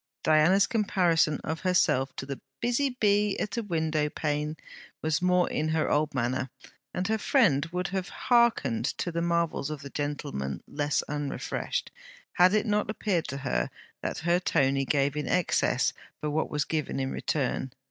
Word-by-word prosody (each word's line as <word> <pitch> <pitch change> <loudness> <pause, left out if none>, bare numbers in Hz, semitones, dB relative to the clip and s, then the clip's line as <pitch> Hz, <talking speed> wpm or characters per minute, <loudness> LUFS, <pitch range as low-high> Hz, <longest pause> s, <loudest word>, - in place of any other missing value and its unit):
Diana's 160 +6 +5
comparison 180 - +2
of 160 0 -3
herself 140 -8 +2
to - - -5
'the 140 -1 -6 0.2
busy 250 +2 0
bee 205 -1 +3
at 205 +2 -3
a - - +1
window 160 -6 0
pane,' 150 0 -2 0.5
was 155 +1 +1
more 180 0 +3
in 155 - -1
her 160 -1 +1
old 150 -1 +1
manner; 130 +1 -1 0.4
and 180 +1 -2
her 220 +1 0
friend 185 - +3
would 180 +3 -3
have 190 0 -3
hearkened 235 - +2
to 175 - -2
the 170 0 -1
marvels 170 -4 0
of 155 -2 -6
the 140 - -8
gentle 145 0 -3
man 70 0 -4
less 145 0 0
unrefreshed, 145 -1 -3 0.4
had 185 +2 +5
it 215 - +2
not 210 -1 0
appeared 200 -6 -1
to 140 - -4
her 60 - -1 0.3
that - - -3
her 175 +1 +3
Tony 135 -5 +1
gave 140 0 +1
in 150 - -2
excess 180 -2 +2 0.3
for 150 - -2
what 160 +2 0
was 150 -1 -1
given 155 -4 -2
in 135 0 -1
return. 135 -2 -1
160 Hz, 170 wpm, -28 LUFS, 145-185 Hz, 0.5 s, Diana's